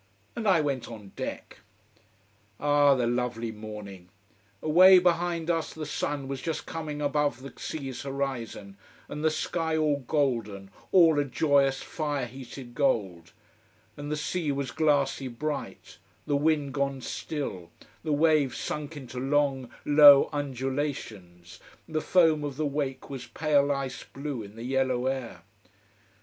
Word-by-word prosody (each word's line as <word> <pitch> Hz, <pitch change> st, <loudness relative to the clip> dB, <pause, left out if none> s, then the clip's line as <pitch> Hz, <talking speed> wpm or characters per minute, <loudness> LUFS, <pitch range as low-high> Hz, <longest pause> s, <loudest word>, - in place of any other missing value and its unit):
And 230 Hz, -2 st, -3 dB
I 185 Hz, -5 st, +5 dB
went 140 Hz, -4 st, -2 dB
on 105 Hz, -4 st, -10 dB
deck. -, -, -6 dB, 1.0 s
Ah 145 Hz, -1 st, +4 dB
the 125 Hz, -2 st, 0 dB
lovely 120 Hz, -1 st, -1 dB
morning! 105 Hz, -4 st, -9 dB, 0.5 s
Away 185 Hz, +4 st, +8 dB
behind 175 Hz, -1 st, +1 dB
us 165 Hz, -1 st, -2 dB
the 155 Hz, -1 st, -5 dB
sun 145 Hz, -1 st, -3 dB
was 135 Hz, -1 st, -4 dB
just 165 Hz, -2 st, -3 dB
coming 150 Hz, -2 st, -5 dB
above 145 Hz, -2 st, 0 dB
the 135 Hz, -, -9 dB
sea's 135 Hz, -5 st, -5 dB
horizon, 135 Hz, -8 st, -4 dB, 0.3 s
and 150 Hz, +1 st, -6 dB
the 160 Hz, -, +4 dB
sky 160 Hz, +1 st, -1 dB
all 150 Hz, -2 st, +2 dB
golden, 115 Hz, -9 st, -1 dB, 0.2 s
all 165 Hz, -5 st, +6 dB
a -, -, +3 dB
joyous, 140 Hz, -1 st, +2 dB
fire 145 Hz, -5 st, -2 dB
heated 125 Hz, 0 st, -10 dB
gold, 100 Hz, -, 0 dB, 0.6 s
and 145 Hz, 0 st, -6 dB
the 150 Hz, -, -1 dB
sea 155 Hz, 0 st, -1 dB
was 140 Hz, -1 st, -3 dB
glassy 145 Hz, -4 st, +1 dB
bright, 145 Hz, +5 st, -5 dB, 0.3 s
the 145 Hz, -, 0 dB
wind 145 Hz, -2 st, +1 dB
gone 140 Hz, -1 st, -1 dB
still, 120 Hz, -, -5 dB, 0.3 s
the 155 Hz, -, -2 dB
waves 150 Hz, -3 st, +3 dB
sunk 150 Hz, +1 st, -4 dB
into 130 Hz, -2 st, -7 dB
long, 135 Hz, -1 st, +1 dB, 0.2 s
low 145 Hz, -1 st, +8 dB
undulations, 130 Hz, -, -4 dB, 0.3 s
the 155 Hz, 0 st, -2 dB
foam 160 Hz, -4 st, +3 dB
of 140 Hz, -2 st, -4 dB
the 155 Hz, -, 0 dB
wake 140 Hz, -2 st, -3 dB
was 130 Hz, -2 st, -6 dB
pale 145 Hz, -2 st, +2 dB
ice 135 Hz, -2 st, -3 dB
blue 140 Hz, -3 st, -6 dB
in 100 Hz, 0 st, -11 dB
the 115 Hz, -, -8 dB
yellow 130 Hz, -1 st, 0 dB
air. 130 Hz, -3 st, -3 dB
140 Hz, 140 wpm, -28 LUFS, 125-150 Hz, 1.0 s, Away